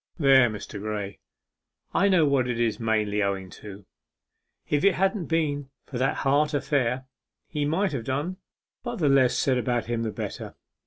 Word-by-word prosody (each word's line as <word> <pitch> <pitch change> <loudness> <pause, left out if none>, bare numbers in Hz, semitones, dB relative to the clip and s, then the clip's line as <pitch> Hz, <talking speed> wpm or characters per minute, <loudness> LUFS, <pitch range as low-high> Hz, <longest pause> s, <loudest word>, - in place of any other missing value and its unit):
There, 135 -6 +6
Mr. 105 -1 -7
Graye, 105 -2 -4 0.7
I 200 - +3
know 180 -5 +4
what 140 -3 +2
it 120 -2 -2
is 115 -2 0
mainly 105 -2 0
owing 95 -2 -2
to. 100 -1 -10 0.8
If 145 0 +1
it 200 -2 +5
hadn't 195 0 +1
been 145 -4 -1 0.2
for 125 - -6
that 130 - +1
heart 145 +2 +3
affair, 135 -3 0 0.4
he 150 -2 -2
might 175 +5 +1
have 125 -6 -4
done 145 +9 -2 0.4
but 240 0 -4
the 155 -9 +1
less 135 -2 +4
said 130 -2 +2
about 120 -1 -1
him 120 0 -2
the 115 - -1
better. - - -6
130 Hz, 170 wpm, -26 LUFS, 115-150 Hz, 0.8 s, There